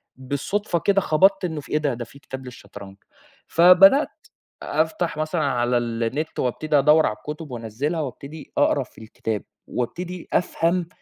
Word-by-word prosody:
بالصدفة 155 +9 -2
كده، 195 +3 +2
خبطت 195 +4 +3
إنّه 160 -4 -3
في - - -14
إيه - - +2
ده؟! 150 -3 0
ده 120 0 -5
في 140 - -15
كتاب 130 -2 -8
للشطرنج، 100 -5 -11 0.5
فبدأت 180 - +6 0.6
أفتح 160 +1 -1
مثلًا 155 +2 -1
على 125 -3 +1
النت، 120 +6 -2
وأبتدي 150 +4 0
أدوّر 150 +3 +5
على 105 - -1
الكتب، 150 +6 -8
وأنزلها، 125 +8 -3
وأبتدي 140 +3 -8
أقرا - - +3
في - - -17
الكتاب، 110 -1 -4 0.2
وأبتدي 175 +8 -4
أفهم 175 0 +1
150 Hz, 145 wpm, -23 LUFS, 125-170 Hz, 0.6 s, فبدأت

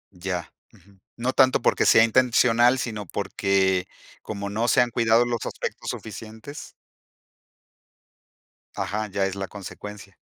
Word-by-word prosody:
Ya, 90 -2 -4 0.2
ujú. 95 +1 -23 0.2
No 125 +2 -1
tanto 130 -1 +4
porque - - +2
sea 110 - +7
intencional, 120 +1 +4
sino 110 -5 -4
porque 95 -1 0 0.3
como 100 -1 -5
no 115 +3 0
se 125 - +4
han 120 -1 +1
cuidado 115 0 +3
los 120 -1 -2
aspectos - - -5
suficientes. 110 +6 -8 2.0
Ajá, 110 +1 -2
ya 100 0 -1
es 95 - -5
la 95 -1 -4
consecuencia. 100 0 -10
110 Hz, 130 wpm, -24 LUFS, 100-120 Hz, 2.0 s, sea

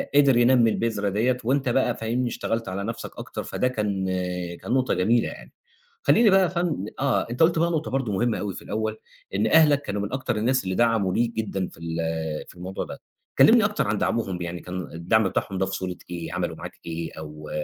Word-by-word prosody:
قدر 140 -4 +6
ينمّي 120 -1 +5
البذرة 110 -3 0
ديّة، 120 +6 +1
وأنت 130 +2 +1
بقى 120 -1 +2
فاهمني، 120 +3 -1
اشتغلت 115 -2 -2
على 95 +2 -3
نفسَك 115 +2 -5
أكتر - - -6
فده 125 - -1
كان 105 -6 -1 0.6
كان - - -5
نقطة 130 0 +2
جميلة 110 +6 +2
يعني، - - -9 0.5
خليني 230 - +5
بقى 195 0 +6
يا 180 - +3
فن 170 - -1
آه، 135 -2 +1
أنت 125 +7 +2
قُلت 165 0 +4
بقى 170 +1 +2
نقطة 160 -1 -2
برضه 130 -5 -1
مهمّة 115 +3 +1
أوي 100 -2 -3
في - - -8
الأول 110 0 -3 0.4
إن 105 +2 +2
أهلَك 150 -1 +5
كانوا 105 -7 -3
من 100 +4 -4
أكتر 130 -3 -1
الناس 130 +4 +1
اللي 95 0 -2
دعموا 115 -5 +2
ليك 120 0 +1
جدًا 100 -4 -2
في - - -15
ال 85 0 -4 0.5
في - - -14
الموضوع 90 +2 -5
ده، - - -9 0.4
كلمني - - +7
أكتر - - 0
عن - - 0
دعمهم 95 -6 -1
يعني 85 0 -4
كان 90 +1 -5
الدعم 95 +6 +2
بتاعهم 95 +1 -2
ده 95 - +1
في 95 - -5
صورة 90 -2 -4
إيه 85 -2 -5
عملوا - - -2
معاك - - -9
إيه؟ 85 -1 -4
أو 75 0 -9
110 Hz, 210 wpm, -25 LUFS, 95-130 Hz, 0.6 s, كلمني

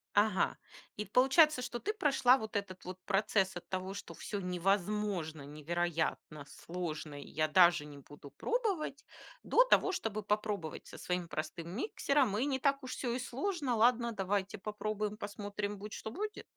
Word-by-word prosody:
Ага, 205 -3 +3 0.4
и 210 - -2
получается, 265 - +5
что 240 -1 -4
ты 425 - -2
прошла 270 - +4
вот 220 -2 -7
этот 190 -2 -5
вот 185 +1 -7
процесс 195 -1 +2
от 175 - -7
того, 185 +1 -3
что 200 -4 -7
всё 200 +5 -5
невозможно, 180 -3 0
невероятно, 155 0 -2
сложно, 155 -4 -5
и - - -10
я 155 0 +1
даже 170 -2 +5
не 145 -1 -10
буду 145 +1 -12
пробовать, 400 - -1 0.4
до - - +5
того, - - +4
чтобы 215 - -2
попробовать 205 -5 -2
со - - -11
своим 180 -1 -2
простым 160 +2 -4
миксером. 260 - +1
И 255 - +1
не 265 -2 0
так 275 0 +2
уж 255 - -6
всё 240 -3 -2
и 250 - -1
сложно. 275 +2 -1
Ладно, 235 +1 +4
давайте 195 0 -1
попробуем, 210 +1 -3
посмотрим, 205 0 -4
будь 210 +2 -8
что 220 - -5
будет? 420 - -4
205 Hz, 165 wpm, -33 LUFS, 175-250 Hz, 0.4 s, получается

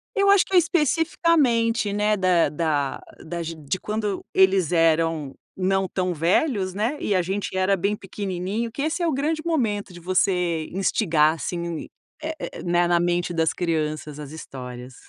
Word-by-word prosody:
Eu 400 0 +4
acho 400 -1 +6
que 385 - -6
eu - - +8
especificamente, 300 - +2
né, 210 +1 +2
da 185 -3 +3
da 150 -3 -1 0.2
das 170 0 -5
de 160 +2 -4
quando 210 -2 -3
eles 190 -3 +4
eram 165 -3 +2 0.2
não 190 0 +1
tão 180 0 -1
velhos, 185 - +1
né, 220 +9 -1
e 205 - 0
a 185 - +3
gente 190 +2 -3
era 190 +1 +2
bem 200 +4 0
pequenininho, 195 +3 -4
que 275 - -4
esse 320 +3 -1
é 340 - +2
o 315 - +1
grande 310 +4 -1
momento 220 - -1
de 175 - -11
você 180 -2 +1
instigar 165 -5 +2
assim, 170 -1 -4 0.3
eh 315 +1 -3
eh - - -3
eh, - - -7
né, 175 0 +2
na 175 0 +3
mente 175 0 0
das 160 -1 +2
crianças 155 -3 -2
as 145 - -8
histórias. 125 -4 -8
185 Hz, 170 wpm, -24 LUFS, 165-220 Hz, 0.3 s, eu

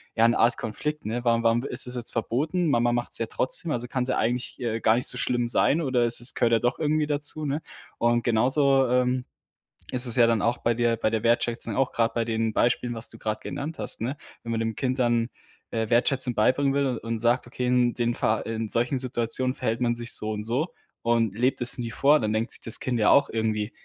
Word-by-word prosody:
ja 115 0 +4
'ne 115 - +1
Art 120 +2 +3
Konflikt, 150 +8 -5
ne? 120 +3 -3
„Warum 115 -1 +1
warum 115 +1 +2
ist - - +3
das 125 - -7
jetzt 120 -2 -6
verboten? 150 - -1
Mama 120 -3 +2
macht 120 0 -3
es - - +4
ja 115 - -2
trotzdem. 130 +9 -1
Also 125 -3 -3
kann 130 0 -2
es 125 - -3
ja - - 0
eigentlich, 120 +2 -2
äh, 115 -2 -2
gar 110 0 +3
nicht 125 - 0
so 125 - +2
schlimm 120 -1 0
sein, 140 +6 +2
oder 130 -5 +1
es 120 0 +4
ist 120 +1 +2
gehört 115 -1 +1
ja 115 - +4
doch 120 +3 -1
irgendwie 155 0 +1
dazu“, 150 +1 0
ne? 145 +2 -2 0.4
Und 120 0 +1
genauso, 135 +3 +2
ähm, 125 0 0 0.7
ist 125 0 +7
es 120 0 +5
ja 120 -1 +5
dann 115 -2 +1
auch 120 +3 0
bei 120 - 0
der 115 0 0
bei 110 - 0
der 110 -1 -2
Wertschätzung 120 0 0
auch 135 -1 0
gerade 115 0 0
bei 115 -1 0
den 115 -1 -1
Beispielen, 120 +2 0
was 115 +1 -3
du 115 - -11
gerade 110 -1 -3
genannt 145 +3 -6
hast, - - -5
ne? 130 +6 -3 0.3
Wenn 115 - -5
man 115 - -1
dem 115 -1 -2
Kind 130 +2 -2
dann, 120 -1 +1 0.4
äh, 110 -1 -2
Wertschätzung 125 +1 +2
beibringen 135 +5 +2
will 135 -3 0
und 115 0 -4
sagt: 120 +2 +1
„Okay, 125 +1 -4
in 125 -1 +2
den 120 -1 -1
fa 110 -1 0
in 115 0 -4
solchen 120 +5 0
Situationen 125 0 -1
verhält 115 -3 -3
man 120 -1 0
sich 120 0 -4
so 110 - -1
und 105 -1 -4
so" 125 +9 -1 0.4
und 115 -3 +1
lebt 125 +3 0
es 120 - +6
nie 115 -1 -5
vor, 145 +6 +3
dann 110 -1 -2
denkt 110 +3 -1
sich - - -1
das 115 - -2
Kind 125 -2 -2
ja 105 - +3
auch 140 0 +4
irgendwie: 110 -1 -2
120 Hz, 245 wpm, -25 LUFS, 115-130 Hz, 0.7 s, ist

